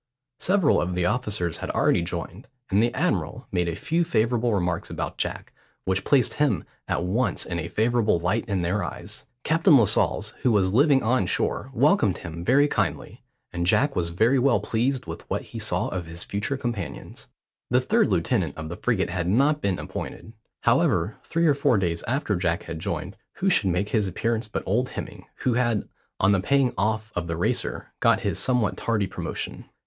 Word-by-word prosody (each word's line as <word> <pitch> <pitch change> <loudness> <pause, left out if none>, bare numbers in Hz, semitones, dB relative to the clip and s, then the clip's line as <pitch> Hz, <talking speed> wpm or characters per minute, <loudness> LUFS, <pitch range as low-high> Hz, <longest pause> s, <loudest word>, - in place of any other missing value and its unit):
Several 185 -5 +3
of 90 +1 -2
the 90 -1 0
officers 100 -6 -1
had - - -5
already - - +2
joined, 85 +5 -5 0.2
and 100 +2 +4
the 120 +1 +2
admiral - - -1
made 90 -1 0
a 85 - -3
few 165 - 0
favourable 120 -6 +1
remarks 90 -4 -1
about - - -5
Jack, - - -3 0.3
which 95 0 0
placed 135 -4 +3
him 135 - +1 0.2
at - - -1
once 105 +3 0
in 85 -1 -3
a 80 - -4
favourable 110 -3 +2
light 100 +7 0
in 95 -3 0
their 100 +5 0
eyes. - - -6 0.2
Captain 160 0 +5
Lascelles, 115 -6 +2
who 125 - +3
was 95 -3 +2
living 140 +2 +4
on 115 -4 +2
shore, - - 0
welcomed - - +3
him 85 +1 -7
very 140 +8 +4
kindly, 90 - -2 0.3
and 85 0 -1
Jack 140 +9 +3
was 85 -1 0
very 115 +10 +3
well 135 0 +3
pleased 125 +3 -1
with 85 -1 -7
what - - -2
he - - -8
saw - - -1
of 90 -2 -4
his 85 +1 -4
future 100 +7 -2
companions. 95 - -5 0.4
The - - +4
third - - +2
lieutenant - - 0
of 80 0 -6
the 85 - -6
frigate 100 -7 0
had 90 -1 -2
not 140 +9 +3
been 95 -3 0
appointed. 110 - -7 0.3
However, - - +2
three 165 +1 0
or 150 - +5
four 140 -4 +2
days 85 -3 -1
after 125 -4 0
Jack 85 -2 0
had 85 -1 -6
joined, - - -4 0.2
who 195 +1 0
should 100 - +2
make 90 +4 0
his 105 -4 +1
appearance 115 +5 -1
but 105 - -4
old 120 +7 +1
Hemming, - - -8
who 125 - +2
had, 120 -3 +1 0.3
on 95 - +4
the 100 - +3
paying 135 +4 +2
off 110 +3 -1
of 90 -1 -2
the 85 -1 -3
Racer, 85 - -1
got - - +3
his - - -1
somewhat 125 -5 +1
tardy 110 -3 0
promotion. - - -5
105 Hz, 190 wpm, -25 LUFS, 90-125 Hz, 0.4 s, Captain